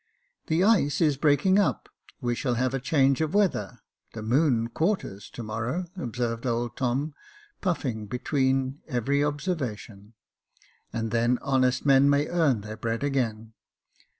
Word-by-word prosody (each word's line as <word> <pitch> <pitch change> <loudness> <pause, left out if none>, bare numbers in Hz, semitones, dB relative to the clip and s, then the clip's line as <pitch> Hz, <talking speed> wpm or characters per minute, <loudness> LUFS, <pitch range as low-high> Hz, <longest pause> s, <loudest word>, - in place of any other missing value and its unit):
" - - -46
The 165 +3 +2
ice 170 -10 +3
is 150 -4 +3
breaking 155 +8 +3
up 205 - 0 0.2
— - - -25
we 120 -2 0
shall 125 0 -1
have 130 +2 0
a 135 - 0
change 135 +1 +2
of 160 +4 -1
weather 180 - +1 0.2
— - - -41
the 110 - -5
moon 120 -1 +2
quarters 160 - -2
to 120 - -8
morrow," 115 +11 -3
observed 120 - -3
old 120 0 -1
Tom, 135 +4 -1 0.5
puffing 130 - -2
between 130 +3 0
every 140 +4 0
observation; 130 - -4 0.4
" - - -34
and 115 -1 -3
then 120 +2 +2
honest 130 -2 +1
men 140 0 +5
may 145 +1 +3
earn 155 -10 +2
their 110 +1 -8
bread 115 +3 -2
again. 115 -6 -2
130 Hz, 155 wpm, -26 LUFS, 115-150 Hz, 0.5 s, men